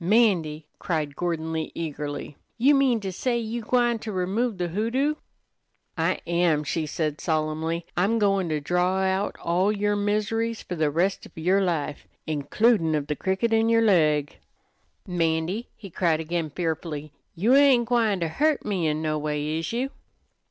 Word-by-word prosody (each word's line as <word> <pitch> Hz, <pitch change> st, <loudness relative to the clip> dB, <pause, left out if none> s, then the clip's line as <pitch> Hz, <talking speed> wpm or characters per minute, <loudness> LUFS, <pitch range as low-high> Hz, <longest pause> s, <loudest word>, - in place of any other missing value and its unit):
"'Mandy," 175 Hz, -7 st, +2 dB
cried 155 Hz, -5 st, -2 dB
Gordon 165 Hz, -2 st, -2 dB
Lee, 160 Hz, -1 st, -3 dB
eagerly, 150 Hz, -2 st, -5 dB, 0.2 s
"you 270 Hz, +5 st, +5 dB
mean 270 Hz, -4 st, +3 dB
to 195 Hz, -2 st, -3 dB
say 240 Hz, +6 st, -1 dB
you 230 Hz, +1 st, -3 dB
gwine 240 Hz, 0 st, +1 dB
to 215 Hz, -, -5 dB
remove 200 Hz, +4 st, -1 dB
the 175 Hz, -1 st, -2 dB
hoodoo?" 230 Hz, -, 0 dB, 0.8 s
"I -, -, 0 dB
am," 170 Hz, -3 st, +2 dB
she 155 Hz, +2 st, -2 dB
said 150 Hz, -1 st, -2 dB
solemnly. 160 Hz, +1 st, -1 dB
"I'm 200 Hz, +6 st, +2 dB
goin' 195 Hz, -4 st, +2 dB
to 155 Hz, -1 st, 0 dB
draw 180 Hz, +5 st, +1 dB
out 190 Hz, +1 st, 0 dB
all 180 Hz, +4 st, +1 dB
yer 205 Hz, 0 st, 0 dB
miseries 215 Hz, +2 st, -1 dB
fer -, -, -6 dB
the 155 Hz, -3 st, +1 dB
rest 175 Hz, +6 st, 0 dB
of -, -, -25 dB
yer 185 Hz, +5 st, +2 dB
life, 160 Hz, -6 st, -2 dB, 0.2 s
includin' 160 Hz, -, +2 dB
of 145 Hz, -2 st, -1 dB
the 150 Hz, 0 st, -2 dB
cricket 190 Hz, +8 st, 0 dB
in 225 Hz, 0 st, +3 dB
yer 230 Hz, 0 st, +4 dB
leg." 155 Hz, -9 st, +2 dB, 0.7 s
"'Mandy," 175 Hz, +3 st, -1 dB
he 195 Hz, -4 st, -11 dB
cried 165 Hz, -2 st, +1 dB
again 165 Hz, 0 st, -2 dB
fearfully, 155 Hz, -2 st, -4 dB, 0.2 s
"you 210 Hz, +9 st, +3 dB
ain't 270 Hz, -4 st, +6 dB
gwine 225 Hz, -6 st, +2 dB
ter 165 Hz, -, +1 dB
hurt 295 Hz, -, +1 dB
me 185 Hz, -6 st, 0 dB
in 155 Hz, +1 st, -1 dB
no 155 Hz, -1 st, 0 dB
way, 150 Hz, +1 st, -2 dB
is 165 Hz, -, -4 dB
you?" 255 Hz, +4 st, -2 dB
180 Hz, 165 wpm, -25 LUFS, 160-220 Hz, 0.8 s, ain't